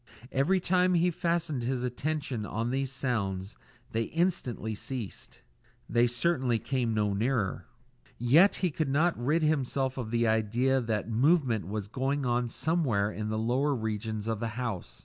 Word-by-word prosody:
Every 155 +8 +2
time 180 0 +2
he 175 +1 +3
fastened 170 -5 -1
his 125 +1 -1
attention 135 -1 -2
on 115 +3 -2
these 135 0 -1
sounds, 105 -7 -2 0.4
they 115 0 0
instantly 145 -10 -1
ceased. 115 0 -7 0.5
They 120 +1 +3
certainly 125 -1 +1
came 120 -2 -1
no 105 -1 +1
nearer. 110 -1 -1 0.5
Yet 150 - +5
he 175 - +1
could 150 -1 -1
not 160 +5 +2
rid 150 +7 +1
himself 135 -3 0
of 115 -3 -4
the 115 0 +1
idea 115 +5 +2
that 110 -3 -2
movement 125 - +2
was 105 0 -4
going 135 +4 -1
on 120 0 +1
somewhere 120 -9 0
in 105 0 -4
the 110 - -1
lower 130 +6 +1
regions 110 -2 -3
of 110 -2 -1
the 115 - -2
house. 95 - -4
125 Hz, 155 wpm, -29 LUFS, 110-145 Hz, 0.5 s, Yet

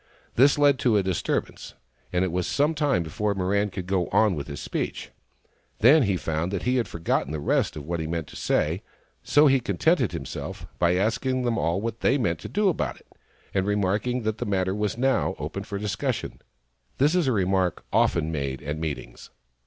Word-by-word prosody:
This 135 +4 +5
led 145 -2 +4
to 120 -6 +3
a 100 - +2
disturbance, 95 -3 -2 0.4
and 90 +1 +1
it 90 - -2
was 90 0 -1
some 145 +3 +2
time 145 - +1
before 100 +6 -2
Mirran 100 +2 +1
could 95 -1 -5
go 95 -2 0
on 110 - +3
again 95 - -1
with 70 - -5
his 70 -2 -6
speech. - - -4 0.7
Then 140 +8 +6
he 100 -6 +1
found 80 +2 -2
he 125 +5 0
had 120 - 0
forgotten 85 -3 -1
the 80 - -3
rest 75 - +1
of 75 -2 -7
what 85 +1 -2
he 80 - -3
meant 85 -1 -2
to - - -12
say, - - 0 0.4
so 145 +1 +4
he 135 -2 +5
contented 100 -8 +1
himself - - -6
by 85 0 +3
asking 125 +6 0
them 120 -2 +1
all 85 +4 0
what 115 +1 -4
they 135 - +3
meant 85 -10 0
to - - -8
do 210 +1 +1
about 180 - 0
it, - - -25 0.4
and 95 0 0
remark 105 +2 0
ing 125 -1 -1
that 110 0 -2
the - - -2
matter 95 -2 0
was 105 0 -2
now 135 +2 +1
open 75 +7 -5
for 100 0 -5
discussion. 105 +5 -3 0.6
This 145 +4 +3
is 180 -5 +2
a - - +3
remark 95 -4 0
often 80 -1 +2
made 70 -3 -3
at 75 +2 -3
meetings. 80 -3 -6
100 Hz, 205 wpm, -25 LUFS, 85-125 Hz, 0.7 s, Then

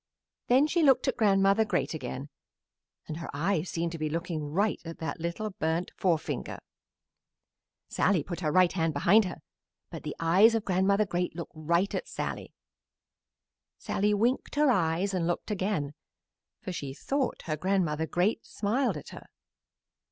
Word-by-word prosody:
Then 260 +4 +5
she 335 +2 +1
looked 275 -4 +4
at - - +1
Grandmother 195 0 +4
Great 150 -9 -1
again 135 -1 -5 0.8
and 155 - -5
her 165 - -7
eyes 170 +2 0
seemed 170 0 -2
to 165 - -6
be 155 0 -1
looking 165 0 -3
right 200 +6 +1
at 165 0 -7
that 160 - -4
little 170 +6 -3
burnt 165 -1 -2
forefinger. 165 -4 -1 1.3
Sallie 180 -7 +1
put 175 -2 -5
her 155 -4 0
right 185 0 +4
hand 165 -3 0
behind 195 +9 +5
her, 180 - -7 0.5
but - - -7
the - - -5
eyes 190 +8 +5
of 225 - -1
Grandmother 195 +3 +2
Great 180 -2 -2
looked 170 - -6
right 170 +5 0
at - - -3
Sallie. - - -5 1.2
Sallie 210 +1 0
winked 240 +8 0
her 295 -2 +4
eyes 185 -1 +1
and 175 -3 0
looked 175 +5 -2
again, 185 -8 -1 0.7
for - - -4
she 140 -6 -5
thought 275 - -2
her 155 - -2
Grandmother 160 -2 0
Great 190 +8 0
smiled 225 - -1
at 150 - -9
her. - - -11
180 Hz, 160 wpm, -29 LUFS, 160-205 Hz, 1.3 s, Then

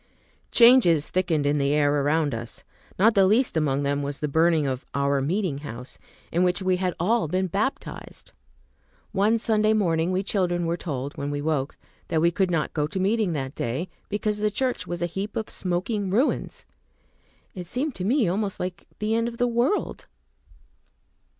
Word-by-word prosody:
Changes 235 - +6
thickened 170 -5 0
in 145 +1 +2
the 140 +1 +1
air 145 -1 +2
around 150 0 +1
us. 115 0 -6 0.3
Not 215 +4 +5
the 195 -3 +5
least 230 +3 +2
among 145 -3 +1
them 140 0 0
was 140 0 -4
the 150 - -1
burning 160 +1 +3
of 130 -1 -2
"our 140 0 +1
meeting 165 0 -1
house," 125 -3 -8 0.3
in 170 - +1
which 180 +1 +2
we 185 -1 +1
had 180 -2 -1
all 210 +1 +1
been 185 +4 0
baptized. 205 +9 -4 0.8
One 210 +3 +2
Sunday 215 -1 +2
morning 170 -5 +1
we 185 +1 0
children 175 -4 0
were 165 +1 0
told, 140 -5 -5
when 140 0 -3
we 145 0 -2
woke, 145 -2 -2 0.3
that 160 - 0
we 170 +2 +3
could 190 +1 +1
not 165 -3 -1
go 150 -1 0
to 190 - -4
meeting 200 -1 +1
that 135 -3 -3
day, 135 +10 -3 0.2
because 210 0 -1
the 210 0 +2
church 255 +4 -2
was 175 0 -3
a - - +2
heap 195 +5 -5
of 220 - -3
smoking 190 +3 -2
ruins. 240 +10 0 0.9
It 180 -3 -7
seemed 265 - -2
to 185 - -5
me 235 +2 +2
almost 195 +2 -1
like 180 0 -5
the 215 +1 -1
end 230 +1 +1
of 235 0 -6
the 245 - +2
world. 240 - -1
180 Hz, 180 wpm, -25 LUFS, 150-210 Hz, 0.9 s, Changes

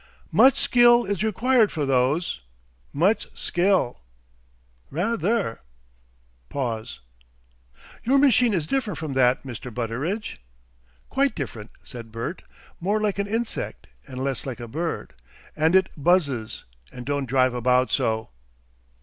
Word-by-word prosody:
"Much 265 +1 +6
skill 240 -1 +5
is 200 -1 -2
required 225 +1 +3
for 150 -3 -2
those! 135 - +1 0.5
much 185 +10 +2
skill!" 175 - +1 0.9
"Rather!" 200 - -1 0.9
Pause. 115 - -4 1.0
"Your 265 +4 +3
machine 250 -4 +4
is 175 -7 0
different 220 - -2
from 150 -2 -4
that, 130 -1 +3
Mr. 125 -1 -7
Butteridge?" 125 - -3 0.7
"Quite 275 -3 +1
different," 115 -7 -6
said 115 -2 -10
Bert. 115 +10 -5 0.4
"More 200 +5 0
like 210 -2 -1
an 200 - 0
insect, 225 +2 -3 0.2
and 130 0 -5
less 135 -2 -2
like 130 -2 -6
a 120 - -7
bird. 160 +8 -4 0.4
And 160 +3 +2
it 190 -1 +5
buzzes, 140 -8 +1 0.3
and 125 -1 -9
don't 145 -1 -1
drive 130 -1 +3
about 125 +1 +2
so. 110 - 0
155 Hz, 125 wpm, -24 LUFS, 125-210 Hz, 1.0 s, Much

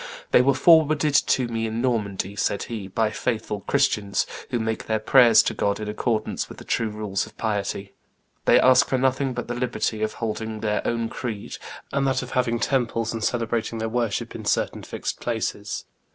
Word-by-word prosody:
"They - - +7
were 135 +1 +3
forwarded 155 -1 +5
to 130 -2 +3
me 115 -1 -2
in 110 +1 -3
Normandy," 100 -6 -1
said 100 0 0
he, 110 -5 -6
"by 105 +3 0
faithful 110 -3 -2
Christians, 100 +1 +1 0.2
who 120 - 0
make 110 -1 -3
their 110 - +1
prayers 115 0 +6
to - - -1
God 100 0 0
in 105 - -5
accordance 110 +1 -2
with - - -10
the - - -10
true 115 - 0
rules 105 -2 -3
of - - -18
piety. 100 -2 -2 0.5
They - - +6
ask 130 +2 +5
for 130 - +1
nothing 130 0 +1
but 120 - -4
the 120 - -3
liberty 120 -3 -2
of 110 0 -1
holding 110 -1 -4
their 105 -1 0
own 115 -1 -1
creed, 110 -5 -5 0.4
and 140 0 +1
that 130 -1 +1
of - - -9
having 120 -2 +1
temples 115 -3 0
and 115 -1 -4
celebrating 115 -1 -1
their 110 0 -2
worship 115 -2 -1
in - - -7
certain - - 0
fixed - - -5
places. - - -3
115 Hz, 190 wpm, -24 LUFS, 110-125 Hz, 0.5 s, They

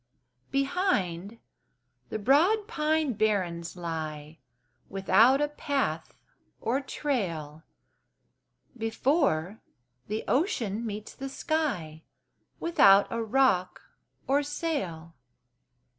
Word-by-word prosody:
Behind, 230 - 0 0.7
the - - -3
broad 335 - +3
pine 310 -3 0
barrens 185 -6 -1
lie 160 -2 -5 0.5
Without 225 +7 +4
a 295 - +2
path 275 - -2 0.4
or 250 +5 0
trail, 170 - -3 1.1
Before, 225 - 0 0.5
the 215 +2 -3
ocean 235 - 0
meets 210 0 -6
the 270 0 -6
sky 265 - -2 0.6
Without 200 -12 +6
a 230 - -1
rock 225 -6 +2 0.5
or 280 +2 +2
sail. 280 - -3
225 Hz, 85 wpm, -28 LUFS, 175-285 Hz, 1.1 s, Without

